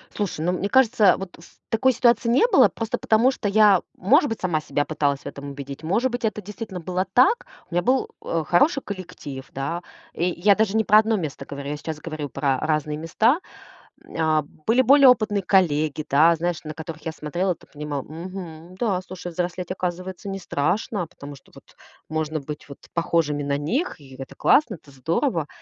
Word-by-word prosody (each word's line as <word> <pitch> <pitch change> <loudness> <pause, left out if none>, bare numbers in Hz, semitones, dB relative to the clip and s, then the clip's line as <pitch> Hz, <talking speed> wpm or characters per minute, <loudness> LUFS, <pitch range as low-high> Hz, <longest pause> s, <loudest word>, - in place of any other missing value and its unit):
Слушай, 200 -7 -3
ну, 180 - +1
мне 180 +2 -1
кажется, 225 -5 +4
вот 195 -2 -8
в 165 - -18
такой 255 +3 +3
ситуации 235 0 +3
не 245 - +4
было, - - +7
просто 225 -1 -3
потому 230 +4 +3
что 225 - -4
я, 205 -2 +5
может 280 - +3
быть, 225 - -4
сама 175 -4 0
себя 145 -1 -1
пыталась 145 -2 -1
в - - -23
этом 140 0 -7
убедить, 140 +1 -8
может 225 +10 +1
быть, 245 -1 -2
это 215 -1 -2
действительно 205 -2 -7
было 185 +2 -2
так. 455 - +4 0.2
У - - -12
меня 175 - +2
был, 255 +7 +1
э, 165 -1 -2
хороший 275 - +3
коллектив, 175 -9 -7
да. 165 +6 -3 0.3
И 170 - -1
я 180 +3 +3
даже 215 -1 +1
не 220 - +3
про 210 - +5
1 220 0 +2
место 155 -8 -4
говорю. 140 0 -7
Я 150 - -3
сейчас 155 0 -6
говорю 155 -2 -5
про 135 -2 0
разные 150 -1 -1
места. 220 - +2 0.6
М, - - -15
э, 160 -1 +2 0.2
были 240 +3 +4
более 275 +2 +7
опытные 215 -5 +3
коллеги, 155 -6 +2
да. 160 +4 +5
Знаешь, 170 0 -2
на 155 - -5
которых 160 0 -8
я 160 - -3
смотрела, 175 +4 -2
т - - -20
понимала: 145 -1 -4
"Мгм, 170 +1 -9
да, 190 -3 0
слушай, 180 -1 -8
взрослеть, 180 +1 -3
оказывается, 185 +1 -4
не 195 0 -4
страшно, 180 +3 -1
потому 145 -4 -11
что 135 - -21
вот - - -17 0.3
можно 155 -1 -2
быть 150 +1 -8
вот 140 - -11
похожими 160 -4 0
на 140 0 0
них, 235 - -2
и 135 -2 -13
это 135 - -9
классно, 265 -8 +3
это 145 -4 -18
здорово". 165 - -1
175 Hz, 195 wpm, -23 LUFS, 155-210 Hz, 0.6 s, было